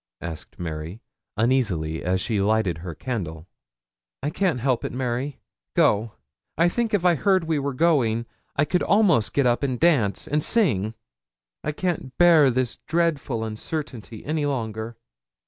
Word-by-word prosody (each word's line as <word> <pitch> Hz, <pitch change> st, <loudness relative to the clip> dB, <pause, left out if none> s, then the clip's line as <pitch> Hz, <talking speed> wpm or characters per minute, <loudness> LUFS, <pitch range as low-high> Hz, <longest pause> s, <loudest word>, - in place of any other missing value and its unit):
asked 80 Hz, -2 st, -7 dB
Mary, 80 Hz, +3 st, -5 dB, 0.4 s
uneasily, 100 Hz, -10 st, +1 dB
as 90 Hz, +1 st, +1 dB
she 105 Hz, -1 st, 0 dB
lighted 100 Hz, -5 st, +1 dB
her 85 Hz, -1 st, -7 dB
candle. 85 Hz, -, -4 dB, 0.8 s
'I 145 Hz, -, -1 dB
can't 180 Hz, -7 st, 0 dB
help 130 Hz, 0 st, 0 dB
it, -, -, -3 dB
Mary. 125 Hz, +2 st, -3 dB, 0.4 s
Go. 105 Hz, +1 st, +3 dB, 0.4 s
I 170 Hz, +2 st, +4 dB
think 230 Hz, +4 st, -1 dB
if 180 Hz, -3 st, -1 dB
I 175 Hz, -, +6 dB
heard 190 Hz, +3 st, +2 dB
we 160 Hz, -2 st, 0 dB
were 140 Hz, -1 st, -2 dB
going, 125 Hz, -8 st, +2 dB, 0.3 s
I 145 Hz, -, +3 dB
could 180 Hz, +4 st, 0 dB
almost 195 Hz, -, +3 dB
get 140 Hz, -, +2 dB
up 120 Hz, -1 st, +2 dB
and 130 Hz, -4 st, -1 dB
dance 135 Hz, -13 st, +2 dB
and 150 Hz, +1 st, 0 dB
sing. 115 Hz, -, +2 dB, 0.7 s
I -, -, -1 dB
can't 155 Hz, -5 st, -3 dB
bear 165 Hz, -5 st, +6 dB
this 130 Hz, -1 st, -1 dB
dreadful 155 Hz, -8 st, -1 dB
uncertainty 110 Hz, -, -6 dB
any 150 Hz, -1 st, 0 dB
longer.' 110 Hz, -4 st, -3 dB
125 Hz, 150 wpm, -24 LUFS, 110-155 Hz, 0.8 s, I